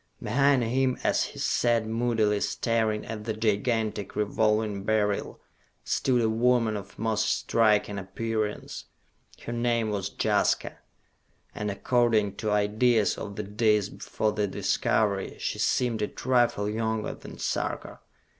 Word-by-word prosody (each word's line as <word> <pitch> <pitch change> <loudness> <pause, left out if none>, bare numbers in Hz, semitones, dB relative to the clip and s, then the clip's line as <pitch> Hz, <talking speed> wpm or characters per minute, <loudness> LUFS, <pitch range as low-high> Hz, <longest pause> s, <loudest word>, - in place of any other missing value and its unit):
Behind 135 +3 +2
him 130 +2 +1
as - - +2
he - - -10
sat 120 -2 +1
moodily 110 -2 +1
staring 110 -2 0
at 110 -1 -6
the 110 -1 -2
gigantic 110 -1 -1
Revolving 105 -1 0
Beryl 105 -1 0 0.4
stood 125 -3 +1
a - - +3
woman 115 0 +2
of 100 0 -8
most 110 -1 0
striking 105 -2 +2
appearance. 110 +2 -4 0.6
Her 120 - -4
name 120 -2 0
was 100 -2 -2
Jaska, - - +1 0.7
and 105 0 -3
according 110 -1 +1
to 110 - -2
ideas 105 +2 +2
of 100 -1 -7
the 105 - -3
Days 105 0 +1
Before 110 -1 -2
the 105 -1 -1
Discovery, 100 +1 0
she - - -3
seemed 120 -5 +1
a 105 - +1
trifle 120 -5 +1
younger 110 0 -2
than - - -11
Sarka. - - -3
110 Hz, 130 wpm, -27 LUFS, 105-115 Hz, 0.7 s, a